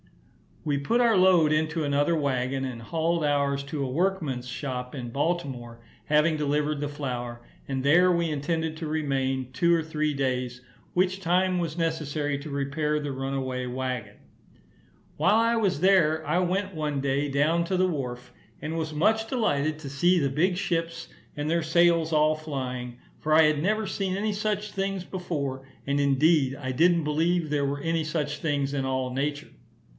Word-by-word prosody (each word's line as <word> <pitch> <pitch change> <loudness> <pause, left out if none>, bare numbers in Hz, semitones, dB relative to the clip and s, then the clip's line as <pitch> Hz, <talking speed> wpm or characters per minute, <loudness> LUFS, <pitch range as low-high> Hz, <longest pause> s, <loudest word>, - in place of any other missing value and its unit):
We 145 -2 0
put 230 +13 +1
our 230 -4 +4
load 180 -4 +5
into 155 +1 0
another 145 +3 +2
waggon, 135 -2 -1
and 125 -3 -6
hauled 165 +5 -1
ours 140 -1 +1
to 140 +1 -4
a 130 - -2
workman's 155 -5 -1
shop 125 -1 -5
in 125 -4 -5
Baltimore, 130 -5 -3 0.2
having 155 +1 +3
delivered 150 0 0
the 145 - -1
flour, 125 -5 -5 0.3
and 135 -1 -2
there 175 +6 +5
we 170 -1 +1
intended 160 +2 -2
to 160 -1 -5
remain 135 -4 -1
two 170 +7 +3
or 165 - +3
three 155 -1 -1
days, 125 -2 -2 0.3
which 185 +1 +1
time 185 +1 +1
was 170 -2 -2
necessary 150 -3 -1
to 150 +2 -8
repair 150 +2 -1
the 145 -1 -4
runaway 135 -1 -3
waggon. 125 -4 -4 1.0
While 210 - +4
I 230 +1 +3
was 195 -9 0
there, 165 -5 +4
I - - +1
went, 190 +1 -1
one 150 -2 -2
day, 140 +1 0
down 150 +5 +2
to 185 +2 -1
the 185 +1 +3
wharf, 125 -6 -4 0.3
and 160 +2 -3
was 155 -1 -3
much 220 +8 +2
delighted 155 - 0
to 145 -3 -7
see 175 +6 +3
the 140 -3 +1
big 175 +6 +1
ships, 165 -2 -2 0.3
and 150 +1 -3
their 170 0 +1
sails 165 0 +3
all 155 0 +4
flying; 125 -5 -5 0.2
for 155 - 0
I 160 +1 +7
had 150 -1 +2
never 215 +5 +1
seen 190 -1 -2
any 210 +2 -1
such 210 0 -2
things 195 -1 -2
before, 140 -8 -4 0.2
and, 140 0 +1
indeed, 140 0 +3
I 130 -2 -4
didn't 170 +5 +3
believe 160 +2 +1
there 145 -1 +1
were 140 +1 -2
any 165 +1 0
such 150 -1 -2
things 145 -3 -1
in 135 - -1
all 130 -1 -1
nature. 145 +3 -2
150 Hz, 175 wpm, -26 LUFS, 135-170 Hz, 1.0 s, I